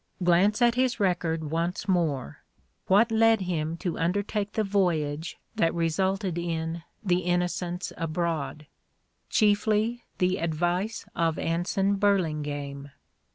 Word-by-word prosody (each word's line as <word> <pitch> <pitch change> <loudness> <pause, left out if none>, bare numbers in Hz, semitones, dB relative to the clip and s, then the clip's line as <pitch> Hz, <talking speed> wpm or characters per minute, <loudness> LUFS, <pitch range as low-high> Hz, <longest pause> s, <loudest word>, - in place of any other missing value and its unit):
Glance 195 +7 +4
at 240 -1 +5
his 255 0 +1
record 165 -5 0
once 170 +5 -2
more. 155 - 0 0.5
"What 220 +5 +4
led 225 -1 +4
him 165 -3 -2
to 175 -1 -3
undertake 205 +4 -1
the 220 - +1
voyage 170 -6 0 0.2
that 165 0 +1
resulted 180 +2 0
in 165 -1 -3 0.2
"The 180 -3 +2
Innocents 180 0 -1
Abroad"? 160 -3 -2 0.6
Chiefly 215 +3 +2
the 185 0 +2
advice 175 +6 -1
of 165 -1 +1
Anson 190 +4 0
Burlingame. 150 -8 -1
175 Hz, 110 wpm, -27 LUFS, 165-200 Hz, 0.6 s, at